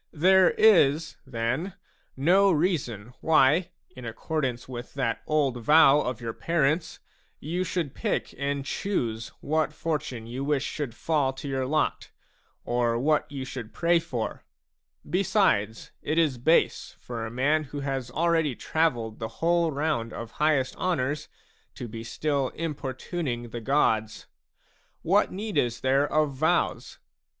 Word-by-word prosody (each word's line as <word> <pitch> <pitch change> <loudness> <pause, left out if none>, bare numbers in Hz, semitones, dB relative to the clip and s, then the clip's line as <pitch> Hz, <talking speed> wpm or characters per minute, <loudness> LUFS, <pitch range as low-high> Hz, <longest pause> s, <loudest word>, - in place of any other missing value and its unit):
There 185 +4 +5
js, 165 -7 +4
then, 130 +9 -2 0.4
no 190 +8 +4
reason 135 - -1
why, 160 +2 +4 0.3
in 125 - -10
accordance 125 +2 -3
with 120 0 -8
that 125 -5 -1
old 145 -5 +1
vow 150 +2 +6
of 125 -5 -3
your 115 -2 -4
parents, 165 +2 0 0.4
you 170 +5 -2
should 170 -6 -2
pick - - -2
and 140 0 -2
choose 115 - -2
what 155 +1 0
fortune 150 -7 -3
you 125 +4 -5
wish 140 -1 0
should 140 -6 -4
fall 145 -4 0
to 135 +2 -8
your 135 -1 -1
lot, 155 +1 0 0.6
or 120 -1 +1
what 150 +4 +1
you 135 -2 -5
should 125 -4 -8
pray 170 0 +3
for; 130 -9 -4 0.6
besides, 180 - +1
it 155 +2 -2
is 150 -7 +2
base 160 +7 +2
for 120 -2 -6
a 110 - -4
man 145 +6 +1
who 145 +1 -6
has 135 -3 -3
already 160 -1 +1
travelled 120 -10 -1
the 110 - -3
whole 170 0 +2
round 140 -6 -1
of 115 -1 -7
highest 150 -4 +1
honours 150 -5 -1 0.5
to 120 - -6
be 115 0 -7
still 140 +2 -1
importuning 135 -4 -4
the 120 +1 -6
gods. 110 -4 +1 0.8
What 195 +5 +3
need 205 +2 -2
is 120 -1 -1
there 135 +2 +2
of 150 -2 +2
vows 160 +6 0
140 Hz, 140 wpm, -27 LUFS, 125-160 Hz, 0.8 s, vow